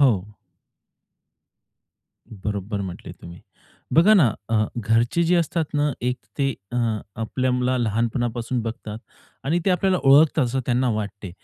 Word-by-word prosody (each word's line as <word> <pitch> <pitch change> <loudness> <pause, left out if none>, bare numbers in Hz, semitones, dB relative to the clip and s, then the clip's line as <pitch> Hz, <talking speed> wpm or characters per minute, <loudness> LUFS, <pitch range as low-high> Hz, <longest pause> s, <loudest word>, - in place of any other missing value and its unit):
हो. 140 -2 +7 2.2
बरोबर 100 0 -4
म्हटले 90 -3 -7
तुम्ही. 85 0 -12 0.5
बघा 190 +7 +6
ना, 140 - +5 0.2
अ, 110 -1 +2
घरचे 115 +7 +1
जे 175 +2 +3
असतात 165 -1 0
ना, 145 -1 +1
एक 125 0 0 0.2
ते 135 -1 +2 0.2
अ, - - -2 0.4
आपल्याला 125 +2 0
लहानपणापासून 120 +2 -1
बघतात 110 -1 -6 0.5
आणि 160 +6 +1
ते 195 - +3
आपल्याला 185 +1 +2
ओळखतात 145 +2 +5
असं 130 +2 -1
त्यांना 125 +1 +2
वाटते, 100 -3 -5
125 Hz, 125 wpm, -23 LUFS, 110-145 Hz, 2.2 s, हो